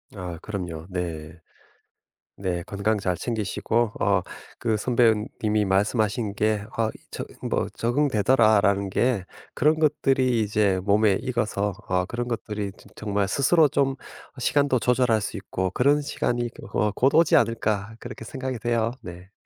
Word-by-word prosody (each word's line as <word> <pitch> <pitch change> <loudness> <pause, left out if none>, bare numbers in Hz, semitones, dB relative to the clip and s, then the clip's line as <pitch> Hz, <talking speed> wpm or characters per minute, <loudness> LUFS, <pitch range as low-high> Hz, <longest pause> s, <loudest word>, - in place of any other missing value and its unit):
아. 90 -3 -6
그럼요. 90 -6 -5
네. 85 -3 -5 1.0
네. 90 -3 -2
건강 105 +2 0
잘 90 -2 -1
챙기시고 115 +1 -1
어 100 -2 +2 0.4
그 110 -2 0
선배님이 110 -2 +1
말씀하신 105 +2 0
게 105 -1 0
아 110 -1 +1 0.2
저 - - -5 0.2
뭐 - - -1
"적응되더라."라는 110 -6 +3
게 120 -3 +1 0.3
그런 155 +1 +3
것들이 135 -5 +2
이제 105 -2 +2
몸에 105 0 +4
익어서 105 -5 -1
어 90 0 +1
그런 120 +4 -4
것들이 105 -3 -3
저 - - -18
정말 100 -2 -1
스스로 150 - +4
좀 135 0 +1 0.4
시간도 140 +1 +2
조절할 125 -2 +2
수 100 - -4
있고 95 -2 -3
'그런 140 +8 +3
시간이 120 -4 -2 0.2
어 105 -1 +1
곧 135 +2 +2
오지 165 0 +5
않을까.' 110 -1 0
그렇게 120 -1 -9
생각이 130 +1 -4
돼요. 115 0 0
네. 90 +3 -11
110 Hz, 280 characters per minute, -25 LUFS, 100-120 Hz, 1.0 s, 오지